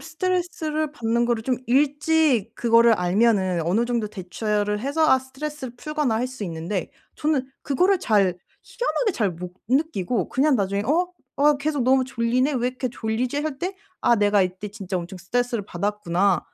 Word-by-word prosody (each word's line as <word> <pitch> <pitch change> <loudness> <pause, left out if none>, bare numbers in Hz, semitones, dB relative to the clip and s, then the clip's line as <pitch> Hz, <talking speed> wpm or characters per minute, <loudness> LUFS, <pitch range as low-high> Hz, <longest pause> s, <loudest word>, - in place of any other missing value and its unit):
스트레스를 325 -3 -2
받는 235 -3 0
거를 235 -2 0
좀 255 0 0
일찍 290 -3 +2
그거를 230 0 +5
알면은 190 -1 +2
어느 210 +7 +2
정도 235 -3 -1
대처를 210 +1 -2
해서 285 +6 +1
아 260 - +6
스트레스를 265 0 -7
풀거나 300 -4 -1
할 240 +3 0
수 255 -4 -8
있는데 170 +2 -4 0.2
저는 290 -4 0
그거를 360 +7 +2
잘 200 -5 +2 0.3
희한하게 - - -1
잘 210 -9 0
못 175 +2 -8 0.2
느끼고 250 - 0
그냥 275 0 +3
나중에 200 0 0
'어, 350 +6 +1 0.2
어 295 +1 +4
계속 290 -1 -1
너무 260 0 +4
졸리네? 255 +2 0
왜 245 0 +1
이렇게 255 0 -3
졸리지?' 240 +2 -2
할 305 -3 -4
때 375 +4 -3 0.2
'아 235 - +4
내가 205 -1 +3
이때 185 +3 -4
진짜 195 -2 -5
엄청 180 +2 -6
스트레스를 235 +3 -1
받았구나.' 195 -1 0
240 Hz, 350 characters per minute, -23 LUFS, 205-290 Hz, 0.3 s, 아